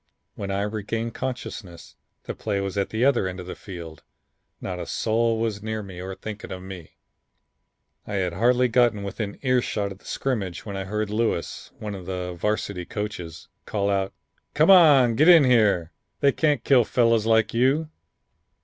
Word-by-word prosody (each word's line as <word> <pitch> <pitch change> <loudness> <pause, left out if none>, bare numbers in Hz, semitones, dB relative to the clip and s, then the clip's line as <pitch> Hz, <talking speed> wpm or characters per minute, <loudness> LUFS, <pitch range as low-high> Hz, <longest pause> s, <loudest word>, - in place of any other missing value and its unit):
When 100 - -6
I 100 +1 -1
regained 110 +2 -3
consciousness 110 -9 -6 0.3
the - - -5
play 100 -2 -2
was 100 0 -3
at 100 -1 -1
the 110 +3 0
other 130 -8 +3
end 95 0 -6
of 90 - -7
the 90 - -6
field, 85 -5 -9 0.6
not 90 -1 -5
a 85 - -6
soul 115 0 +1
was 110 -2 -2
near 110 0 -4
me 95 -2 -9
or 95 +1 -6
thinking 105 +1 -8
of 95 0 -6
me. 95 -4 -10 1.1
I 105 - -4
had 90 -3 -1
hardly 125 +6 +3
got 120 -1 +3
within 100 +1 -5
ear 130 -1 +3
shot 100 -4 -2
of 95 - -10
the - - -24
scrimmage 100 -10 -3
when 100 -2 -6
I 95 0 -4
heard 105 +1 -2
Lewis, 110 -6 -2
one 105 -1 -5
of 95 -3 -8
the 90 -1 -4
Varsity 100 0 -2
coaches, 95 -6 -6 0.2
call 100 -1 0
out, 95 -1 0 0.4
'Come 155 +5 +5
on, 145 -10 +7
get 150 +8 +3
in 170 -4 +9
here, 105 -9 +3 0.3
they 140 - +4
can't 145 -3 +1
kill 130 -3 +5
fellows 115 -1 +2
like 110 -1 +3
you.' 135 +7 +2
105 Hz, 180 wpm, -24 LUFS, 95-120 Hz, 1.1 s, in